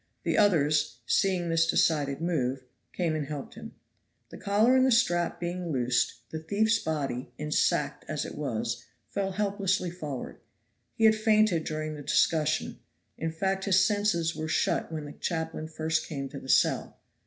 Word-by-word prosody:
The - - 0
others, 155 - +3
seeing 180 +1 +1
this 165 0 +3
decided 145 -4 +1
move, 135 -6 -1 0.3
came 170 -3 -1
and 150 -3 -3
helped 145 -2 -6
him. - - -10 0.6
The - - -10
collar 215 +6 +3
and 260 - +5
the 260 - +4
strap 175 -7 +2
being 175 0 -3
loosed, 120 -2 0
the 160 - -4
thief's 220 +7 +1
body, 140 -7 -3
ensacked 150 0 0
as - - -2
it - - -7
was, 120 -4 -3 0.3
fell 195 -1 -2
helplessly 195 -3 0
forward. 150 -7 -6 0.6
He 225 - -2
had 220 -1 +7
fainted 215 -6 +3
during 155 0 -3
the 150 - -8
discussion; 155 +2 +1 0.4
in 160 +1 -3
fact, 190 +3 -1
his 190 -2 +4
senses 205 -6 +1
were 155 - -4
shut 160 - 0
when 155 -2 -4
the 145 - -8
chaplain 160 -2 -3
first 160 0 -1
came 140 -3 -5
to 140 - -7
the 130 - -11
cell. - - +2
160 Hz, 165 wpm, -28 LUFS, 150-195 Hz, 0.6 s, had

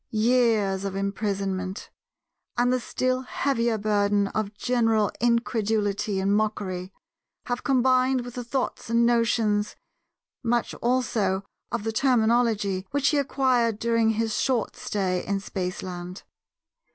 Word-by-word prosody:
Years 220 -4 +2
of 195 -1 -3
imprisonment, 195 -1 -3 0.7
and 245 +1 +3
the 255 - +1
still 255 +1 -1
heavier 240 -3 0
burden 205 -1 +1
of 210 0 -3
general 225 -3 +1
incredulity 220 -4 0
and 195 +1 +2
mockery, 200 -4 -2 0.5
have 245 0 -3
combined 255 -1 +3
with 245 - -8
the 245 - -5
thoughts 250 -1 -3
and 235 0 +3
notions, 225 -3 +1 0.7
and 230 - -2
much 240 -1 +1
also 225 -6 +1 0.3
of 235 -3 -2
the 225 - -1
terminology, 225 -6 +2
which 285 0 +2
he 295 - +2
acquired 255 -5 +1
during 230 0 +2
his 225 -1 0
short 250 -5 0
stay 185 -3 -2
in 200 0 -1
spaceland. 180 -1 -5
220 Hz, 125 wpm, -25 LUFS, 200-245 Hz, 0.7 s, and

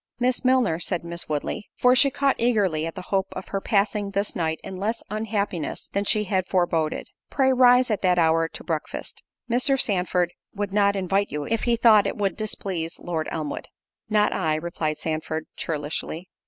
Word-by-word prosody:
"Miss 250 +2 +1
Milner," 250 -10 +3
said 175 0 -2
Miss 170 -1 -4
Woodley, 150 +6 -3
(for 250 0 +5
she 275 +2 +6
caught 275 0 0
eagerly 195 -10 +1
at 165 - -7
the 185 - -6
hope 190 -1 +2
of - - -7
her 195 - -2
passing 205 0 +1
this 200 +1 -2
night 160 -2 -1
in 190 - -7
less 220 +5 -2
unhappiness 205 -6 -3
than 200 +1 -1
she 210 +1 +3
had 190 -2 -1
foreboded) 165 -4 0 0.2
"pray 265 -2 +2
rise 250 -1 +5
at 210 - 0
that 180 -2 +3
hour 165 -1 +3
to - - -8
breakfast; 160 -3 -4 0.3
Mr. 255 +3 +2
Sandford 180 -4 +1 0.2
would 205 -1 -3
not 200 -1 +3
invite 195 +1 0
you, 150 0 -3
if 225 0 -1
he 240 -1 +3
thought 225 -3 +5
it - - -3
would 200 -2 0
displease 185 -6 -2
Lord 160 -3 -3
Elmwood." 150 -3 -4 0.4
"Not 210 -1 +3
I," 155 -1 0
replied 155 -1 -3
Sandford, 160 0 -3
churlishly. 160 +3 -4
195 Hz, 180 wpm, -24 LUFS, 165-215 Hz, 0.4 s, she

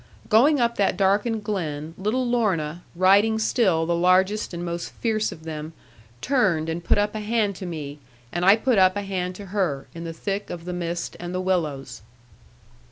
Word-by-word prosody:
Going 270 +7 +5
up 235 -1 +1
that 195 -2 +1
darkened 205 +3 +1
glen, 160 -7 -3
little 215 +8 -1
Lorna, 180 -9 0
riding 200 +5 +4
still 210 -7 +2
the 170 - 0
largest 185 +4 +2
and 175 0 -5
most 170 0 -4
fierce 220 -2 -1
of 160 - -11
them, 155 0 -6 0.5
turned 190 - +1
and 165 +1 -3
put - - +2
up 205 0 +1
a 215 - -3
hand 210 -2 0
to 185 - -6
me, 150 -4 -6 0.3
and 175 - -2
I 195 +3 +7
put 225 -1 +2
up 185 0 +5
a 205 - -2
hand 185 -2 -3
to 200 - -9
her, 160 -10 0
in 170 - -7
the 165 - -5
thick 195 +5 -4
of 170 -1 -7
the 180 - -4
mist 170 -1 -4
and 175 +1 -5
the - - 0
willows. 160 -7 -2
185 Hz, 190 wpm, -24 LUFS, 170-210 Hz, 0.5 s, I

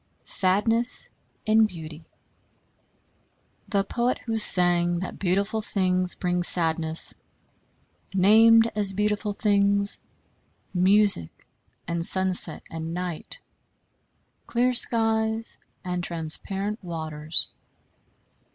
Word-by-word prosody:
Sadness 225 +6 +3 0.3
in 220 0 +2
Beauty 160 -4 -11 1.6
The 200 -2 -1
poet 240 +4 -3
who 225 -1 -3
sang 175 -3 +3
that 185 +1 -8
beautiful 200 +4 -2
things 185 -3 -1
bring 180 -1 -3
sadness, 165 -2 +2 1.0
named 225 +4 +3
as 205 -2 +1
beautiful 210 +1 -3
things 200 -1 0 0.7
music 190 - +2 0.4
and 170 0 -4
sunset 185 -2 +4
and 165 +1 -7
night, 180 -3 -7 1.1
clear 250 +1 -1
skies 225 -1 +1 0.3
and 180 -1 -5
transparent 190 +6 -3
waters. 160 -2 -2
190 Hz, 85 wpm, -23 LUFS, 175-215 Hz, 1.6 s, sunset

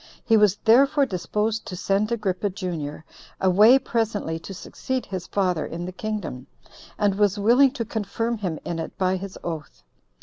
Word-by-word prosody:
He 225 - +4
was 210 -3 +5
therefore 275 +5 +5
disposed 210 +3 -2
to 190 - -5
send 200 +4 0
Agrippa, 205 -3 -1
junior, 165 -6 -5 0.3
away 210 +7 +6
presently 220 -10 -2
to 165 - -10
succeed 255 +6 -4
his 185 -3 -6
father 180 -5 0
in 170 +1 -5
the 180 - -5
kingdom, 185 -10 -5 0.5
and 205 -2 +2
was 205 0 +2
willing 240 +7 +5
to 240 -5 -3
confirm 225 +2 -2
him 180 -6 -3
in 170 -1 -3
it 160 - -6
by 185 0 +1
his 195 0 -7
oath. 160 -3 -6
200 Hz, 165 wpm, -24 LUFS, 180-225 Hz, 0.5 s, away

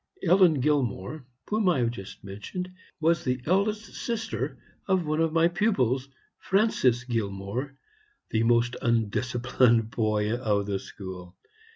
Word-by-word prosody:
Ellen 175 -5 +5
Gilmore, 135 -2 -1 0.2
whom 210 -2 +2
I 175 - +3
have 120 -2 +1
just 95 -5 -10
mentioned, 105 - -6 0.3
was 165 0 +2
the 125 0 0
eldest 210 +5 0
sister 225 -2 -3 0.3
of 190 -3 +2
one 155 +1 0
of 165 -1 +2
my 165 +1 +4
pupils, 135 - +1 0.3
Francis 190 - +2
Gilmore, 115 +3 -3 0.5
the 110 - +2
most 120 +1 +3
undisciplined 115 0 +2
boy 105 -1 0
of 105 -5 0
the 100 -1 -2
school. 95 -3 -9
125 Hz, 130 wpm, -27 LUFS, 110-170 Hz, 0.5 s, Ellen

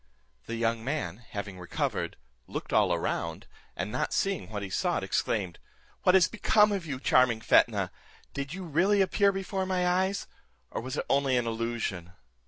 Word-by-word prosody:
The 115 - -3
young 115 0 0
man 115 - -2
having 100 -5 -7
recovered, 90 - -2 0.3
looked - - -5
all - - +4
around, - - -2 0.3
and 95 +4 -3
not - - -1
seeing 195 - 0
what 105 -2 -4
he 95 - -5
sought, - - 0
exclaimed, 95 -6 -1 0.4
"What 180 - +5
is 185 -3 +6
become 210 -1 +3
of 190 -5 -2
you, 135 -3 -3
charming 125 -4 +4
Fetnah? - - +3 0.4
Did 140 0 -4
you 185 +2 -5
really 185 +5 +3
appear 200 +1 +3
before 190 0 -3
my 180 -1 +1
eyes, 190 +2 +1 0.5
or - - -3
was 130 +4 -5
it - - -1
only 135 -2 +2
an 120 - +1
illusion?" 115 -6 -3
135 Hz, 170 wpm, -29 LUFS, 115-185 Hz, 0.5 s, is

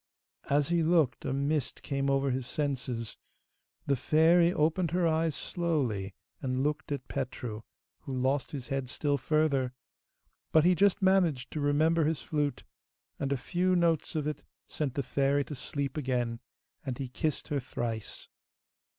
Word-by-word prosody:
As 145 +1 +3
he 170 -1 +3
looked 160 -7 +2
a - - -1
mist 140 +1 -1
came 140 -1 -1
over 135 0 +2
his 125 -1 -2
senses. 130 -7 -2 0.7
The 140 - +2
fairy 165 +6 +4
opened 165 +1 +1
her 175 +1 +2
eyes 160 -1 +1
slowly 130 - -1 0.3
and 130 0 -1
looked 150 +1 -2
at 140 -3 -3
Petru, 125 -4 -4 0.4
who - - -8
lost 130 +2 +1
his 135 -3 -6
head 135 -2 -2
still 145 +1 0
further; 140 -3 +1 0.8
but 155 0 +5
he 180 - +6
just 200 +3 +3
managed 180 -9 +3
to 150 - -3
remember 155 +3 +3
his 155 -1 0
flute, 145 -2 -1 0.6
and 140 - -1
a 140 - +2
few 180 +7 +1
notes 170 -2 +1
of 155 -2 0
it 150 -1 -3 0.2
sent 145 -5 -3
the 140 - 0
Fairy 140 +3 +1
to 150 - -7
sleep 140 0 -3
again, 125 -4 -1 0.4
and 130 -3 -4
he 135 - -3
kissed 150 +5 -2
her 145 -2 0
thrice. 115 -3 -4
145 Hz, 160 wpm, -30 LUFS, 130-160 Hz, 0.8 s, he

